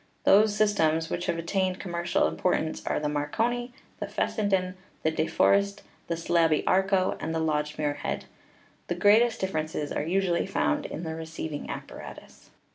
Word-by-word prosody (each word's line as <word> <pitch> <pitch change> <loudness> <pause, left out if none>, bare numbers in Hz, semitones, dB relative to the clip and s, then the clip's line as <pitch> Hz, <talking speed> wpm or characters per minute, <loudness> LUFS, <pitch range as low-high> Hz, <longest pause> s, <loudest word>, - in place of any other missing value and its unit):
Those 210 +1 +5
systems 165 -7 +2
which 175 - -2
have 165 - 0
attained 185 +2 -1
commercial 175 -2 0
importance 160 -3 -1
are - - +1
the 150 - -1
Marconi, 230 +13 -1 0.3
the - - -3
Fessenden, 190 -4 0 0.3
the 160 - +2
De 160 0 0
For - - +4
est, 200 0 0 0.2
the 170 - -1
Slaby 165 -2 +2
Arco, 190 0 +2
and 160 - -3
the - - +1
Lodge 150 -1 -1
Muirhead. 145 -1 -2 0.6
The 175 - -1
great 205 +5 +6
est 240 -1 0
differences 155 -5 -2
are - - -1
usually 175 +2 +1
found 290 +9 0
in 165 - -6
the 160 -1 -3
receiving 160 -2 -6
appa - - -7
ratus. - - -12
175 Hz, 165 wpm, -27 LUFS, 160-195 Hz, 0.6 s, great